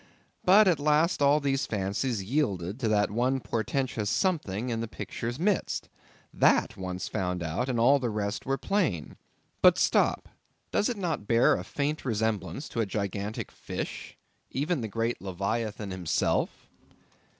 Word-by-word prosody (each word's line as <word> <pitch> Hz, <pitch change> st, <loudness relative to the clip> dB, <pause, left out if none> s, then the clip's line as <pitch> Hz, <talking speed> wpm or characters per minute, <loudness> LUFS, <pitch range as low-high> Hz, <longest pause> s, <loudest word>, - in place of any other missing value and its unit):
But 200 Hz, +3 st, +7 dB
at 170 Hz, -5 st, +3 dB
last 150 Hz, +3 st, +2 dB
all 145 Hz, +1 st, +5 dB
these 135 Hz, -1 st, 0 dB
fancies 100 Hz, +2 st, -1 dB
yielded 100 Hz, -, -1 dB
to 120 Hz, -, 0 dB
that 105 Hz, -2 st, +2 dB
one 125 Hz, +4 st, +1 dB
portentous 115 Hz, -2 st, -2 dB
something 125 Hz, -, 0 dB
in 115 Hz, -1 st, -1 dB
the 115 Hz, -, -3 dB
picture's 120 Hz, +2 st, -5 dB
midst. 195 Hz, +4 st, 0 dB, 0.4 s
That -, -, +3 dB
once 90 Hz, -1 st, -4 dB
found 90 Hz, -4 st, -2 dB
out, 85 Hz, +11 st, -2 dB
and 120 Hz, -2 st, 0 dB
all 135 Hz, +5 st, +5 dB
the 125 Hz, -3 st, -1 dB
rest 105 Hz, 0 st, -2 dB
were 135 Hz, +1 st, -1 dB
plain. 160 Hz, -, -1 dB, 0.5 s
But -, -, +7 dB
stop; -, -, +2 dB, 0.4 s
does 210 Hz, -, +2 dB
it 240 Hz, -, -2 dB
not 165 Hz, -, -2 dB
bear 115 Hz, +1 st, +5 dB
a 90 Hz, -, -2 dB
faint 145 Hz, +9 st, -2 dB
resemblance 110 Hz, -, -1 dB
to 115 Hz, -, -1 dB
a -, -, +1 dB
gigantic 100 Hz, +1 st, -3 dB
fish? -, -, -6 dB, 0.3 s
even 150 Hz, +2 st, -1 dB
the 110 Hz, -, -2 dB
great 115 Hz, +3 st, -2 dB
leviathan 100 Hz, +2 st, -3 dB
himself? 90 Hz, -3 st, +1 dB
115 Hz, 150 wpm, -28 LUFS, 100-140 Hz, 0.5 s, But